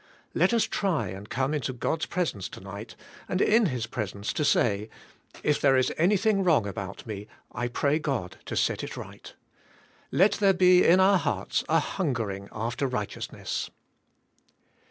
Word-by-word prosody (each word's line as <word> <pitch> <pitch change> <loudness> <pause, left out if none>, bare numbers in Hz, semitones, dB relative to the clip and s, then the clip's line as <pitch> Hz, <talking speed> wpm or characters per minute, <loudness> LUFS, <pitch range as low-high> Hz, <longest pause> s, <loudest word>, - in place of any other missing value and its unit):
Let - - +3
us 235 -2 +3
try 165 - -1
and 95 +3 -8
come 135 +3 0
into 140 -3 -2
God's 155 +6 -2
presence 160 - -2
tonig 100 +3 -8
ht, - - -14 0.3
and 185 - 0
in 220 +1 +4
His 125 -6 -2
presence 100 -3 -4
to 150 - -1
say, 110 -6 +2 0.5
"If 150 - +1
there 135 -2 +5
is 130 - +2
anything 195 +3 +2
wrong 160 - +3
about 100 -1 -6
me 105 -2 -6 0.2
I 120 +2 -2
pray 140 +5 +1
God 130 - -3
to - - -5
set - - 0
it - - -6
right." - - -9 0.8
Let 195 +4 +5
there 200 -1 +3
be 180 0 +6
in 180 +3 +6
our 190 0 +5
hearts - - -1
a - - +4
hungering 115 - -3
after 115 +5 -2
righteousness. 105 -5 -4
130 Hz, 160 wpm, -27 LUFS, -, 0.8 s, be